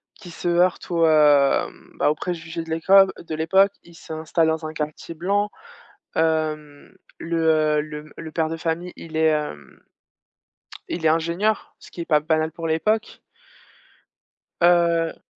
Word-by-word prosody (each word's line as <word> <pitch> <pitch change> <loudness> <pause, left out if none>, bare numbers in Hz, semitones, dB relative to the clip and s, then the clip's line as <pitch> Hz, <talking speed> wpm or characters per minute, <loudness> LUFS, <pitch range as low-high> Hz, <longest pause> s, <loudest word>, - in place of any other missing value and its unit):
qui 190 -5 -13
se 175 +1 -4
heurte 175 +1 +1
aux, 165 -1 +3
hem, 150 -3 +3
bah - - +2
aux - - -2
préjugés 165 0 -5
de 165 0 -5
l'époque, 190 +4 +5
heu, - - -11
de 160 -2 -5
l'époque. 190 +5 +3
Ils 170 - -17
s'installent 160 0 -1
dans 160 0 -2
un 155 - -5
quartier 155 +1 -5
blanc, 200 +5 0 0.7
hem, 155 -2 -1 0.2
le, 160 -2 +1
heu, - - +3
le 150 0 -6
m 150 0 -16
le 160 -1 -7
père 160 -1 0
de 165 - -3
famille 170 +2 -3
il 160 -1 -9
est, 160 0 +3
hem 150 - -4 1.1
il 170 - -4
est - - +5
ingénieur, 170 +7 -1
ce - - -15
qui - - -9
est - - -3
pas 150 -2 +3
banal 160 +1 0
pour 165 - -6
l'époque 215 +8 -1 1.4
heu 170 -1 +2
160 Hz, 165 wpm, -23 LUFS, 155-170 Hz, 1.4 s, l'époque